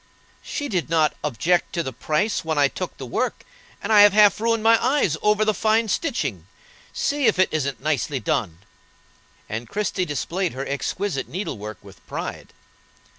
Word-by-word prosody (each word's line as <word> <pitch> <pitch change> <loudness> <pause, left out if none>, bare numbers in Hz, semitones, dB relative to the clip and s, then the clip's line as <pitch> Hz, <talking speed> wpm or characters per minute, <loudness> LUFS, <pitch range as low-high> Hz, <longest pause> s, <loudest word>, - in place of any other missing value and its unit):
"She 290 - -4
did 180 - -2
not 160 -2 +3
object 160 +6 0
to 170 - -1
the 130 - -5
price 195 - -1
when 160 -1 -2
I 145 -1 +5
took - - -6
the - - -7
work, - - -2 0.4
and 220 - 0
I 210 - +8
have 205 -1 +7
half 210 0 +5
ruined 230 -1 +1
my 225 0 +5
eyes 255 - +2
over 210 0 +3
the 215 - +2
fine 220 +2 +2
stitching. 325 - -2 0.4
See 285 -2 0
if - - +3
it 185 - +4
isn't 140 -4 -2
nicely 145 -2 0
done." 95 -5 -2 0.8
And 115 +2 -5
Christie 200 -3 -1
displayed 170 +4 -2
her 135 +2 -4
exquisite 140 +3 -2
needlework 110 - -5
with - - -15
pride. - - -6
180 Hz, 170 wpm, -23 LUFS, 140-215 Hz, 0.8 s, I